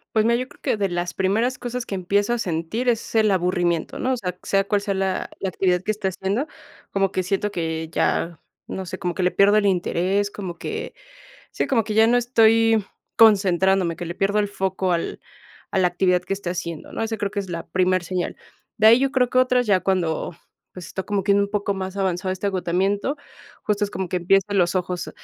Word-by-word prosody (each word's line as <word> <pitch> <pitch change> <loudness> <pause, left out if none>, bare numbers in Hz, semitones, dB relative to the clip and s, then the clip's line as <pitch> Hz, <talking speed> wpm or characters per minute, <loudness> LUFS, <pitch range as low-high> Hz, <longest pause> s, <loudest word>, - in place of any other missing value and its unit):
Pues 215 - +4
mira, 235 +1 +3
yo 255 +1 -3
creo - - -20
que - - 0
de 200 -1 +1
las 175 0 -3
primeras 220 +7 0
cosas 245 0 -4
que - - -6
empiezo 200 +4 0
a 240 - +1
sentir, 180 +6 -2
es 230 -1 0
el 215 -1 +4
aburrimiento, 175 -2 0
¿no? 260 +1 0
O - - +1
sea, 180 -5 -5
sea 195 0 +2
cual 205 0 +1
sea 200 -1 -2
la 190 -1 -1
la 190 - -1
actividad 180 -1 +1
que 215 - 0
esté 210 -2 -3
haciendo, 195 - -2 0.4
como 195 -1 +1
que 185 - 0
siento 195 +3 -1
que 160 -2 -3
ya 165 0 0 0.3
no 190 - -5
sé, 185 - -6
como 180 -2 -2
que 185 - -2
le 180 - +3
pierdo 205 +2 +4
el 205 - +2
interés, 190 +2 +1
como 180 -4 -6
que 450 +3 -5 0.6
sí, - - -2
como 230 -5 +2
que 215 0 -4
ya 220 0 +6
no 240 +2 +3
estoy 225 -3 +4 0.3
concentrándome. 190 -4 +4
Que 175 - -6
le 170 - -4
pierdo 200 +3 0
el 205 -1 +2
foco 190 -2 -1
al 170 -1 -2 0.5
a 190 - +1
la 180 - +4
actividad 180 0 +1
que 195 - -3
esté 190 -3 -4
haciendo, 170 -3 -6
¿no? - - -3
Esa 225 0 -2
creo 205 -1 -2
que 205 - -2
es 190 -2 -5
la 170 -1 -5
primer 185 -1 +1
señal. 180 0 -3 0.4
De 215 - +2
ahí, 230 +3 +8
yo 270 0 +1
creo 250 -3 +2
que 255 - +4
otra 255 -1 +3
es - - -4
ya 190 -2 +4
cuando 180 -3 -1 0.4
Pues, 180 -2 -9
está 190 - -5
como 200 -1 -2
que 200 - +2
un 200 0 +3
poco 205 -1 -1
más 190 0 -5
avanzado 185 -1 -1
este 190 +2 -4
agotamiento. 195 - 0 0.5
Justo 210 -1 0
es 200 - -1
como 190 -2 -4
que 180 - -1
empiezan 195 +2 +2
los 175 +1 +2
ojos 180 -1 -2
195 Hz, 230 wpm, -23 LUFS, 180-215 Hz, 0.6 s, ahí